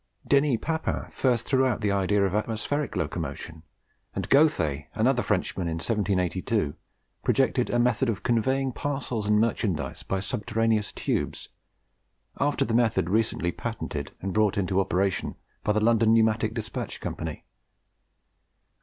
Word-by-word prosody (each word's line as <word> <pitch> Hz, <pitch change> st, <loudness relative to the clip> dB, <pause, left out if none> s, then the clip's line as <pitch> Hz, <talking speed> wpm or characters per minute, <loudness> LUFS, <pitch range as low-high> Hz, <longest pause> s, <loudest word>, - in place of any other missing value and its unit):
Denis 140 Hz, -3 st, +4 dB
Papin 160 Hz, -1 st, -2 dB
first 120 Hz, -3 st, +1 dB
threw 130 Hz, -1 st, +3 dB
out 125 Hz, -5 st, +1 dB
the 105 Hz, -2 st, +1 dB
idea 100 Hz, +1 st, +2 dB
of 95 Hz, -, -1 dB
atmospheric 115 Hz, +7 st, -1 dB
locomotion; 80 Hz, -1 st, -4 dB, 0.5 s
and -, -, -2 dB
Gauthey, 80 Hz, -, +3 dB
another 125 Hz, +3 st, +3 dB
Frenchman, 95 Hz, -4 st, -1 dB
in 80 Hz, -, -1 dB
1782 95 Hz, -2 st, 0 dB, 0.5 s
projected -, -, +2 dB
a 120 Hz, -, +1 dB
method 120 Hz, +1 st, +2 dB
of 110 Hz, -, -2 dB
conveying 130 Hz, +3 st, +1 dB
parcels 125 Hz, -6 st, -3 dB
and 105 Hz, 0 st, +4 dB
merchandise 110 Hz, -6 st, -1 dB
by 95 Hz, -, -2 dB
subterraneous 110 Hz, +1 st, 0 dB
tubes, -, -, -2 dB, 0.9 s
after 145 Hz, 0 st, +1 dB
the 115 Hz, -, -2 dB
method 115 Hz, -7 st, +2 dB
recently 110 Hz, -5 st, +1 dB
patented -, -, -5 dB
and 95 Hz, 0 st, -3 dB
brought 105 Hz, -2 st, +2 dB
into 95 Hz, -1 st, +1 dB
operation 95 Hz, -2 st, 0 dB, 0.3 s
by -, -, +2 dB
the 105 Hz, -, +2 dB
London 115 Hz, 0 st, +4 dB
Pneumatic 110 Hz, 0 st, +2 dB
Despatch 110 Hz, -1 st, -4 dB
Company. -, -, -5 dB
110 Hz, 135 wpm, -27 LUFS, 95-120 Hz, 0.9 s, Denis